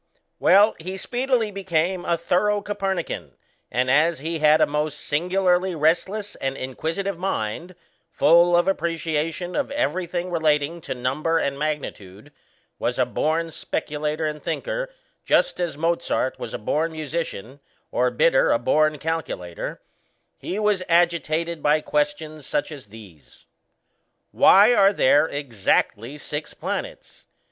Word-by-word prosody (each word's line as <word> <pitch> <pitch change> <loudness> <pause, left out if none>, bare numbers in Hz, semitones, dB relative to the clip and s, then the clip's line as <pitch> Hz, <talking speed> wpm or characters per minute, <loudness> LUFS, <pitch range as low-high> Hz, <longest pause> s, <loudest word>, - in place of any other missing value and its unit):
Well, 205 +3 +5
he 185 +4 -6
speedily 245 0 0
became 185 -2 -1
a 170 - +1
thorough 205 +5 +1
Copernican, 190 - -3 0.3
and 125 +1 0
as 160 +4 +3
he 160 +4 -4
had 155 0 +5
a - - +5
most 150 0 -2
singularly 180 +3 +1
restless 175 +7 0
and 135 0 -3
inquisitive 165 +8 -3
mind, 175 - -3 0.4
full 175 +1 +5
of 175 - +2
appreciation 165 -1 -2
of 285 - -1
everything 180 - -2
relating 160 0 +1
to - - -5
number 135 +7 0
and 140 -3 -1
magnitude 145 -7 -5 0.5
was - - -1
a - - +3
born 165 +2 -1
speculator 150 +1 -3
and 150 -1 -3
thinker - - -3 0.3
just - - +2
as 170 -5 -2
Mozart 165 -5 -1
was - - -5
a - - -2
born 155 +9 -1
musician, 155 -6 -5 0.3
or 125 +1 +2
Bidder 130 +4 +3
a - - +4
born 155 +5 +2
calculator 150 - -4 0.6
he 185 - -4
was 210 -3 +1
agitated 170 -1 +1
by 150 +1 +3
questions 150 0 -2
such 145 - -1
as 140 -7 -10
these: 100 -8 -15 0.9
Why 205 +5 +6
are 200 -3 +5
there 145 -1 +4
exactly 125 -1 -1
six 150 +1 -6
planets? - - -6
160 Hz, 130 wpm, -23 LUFS, 145-180 Hz, 0.9 s, Why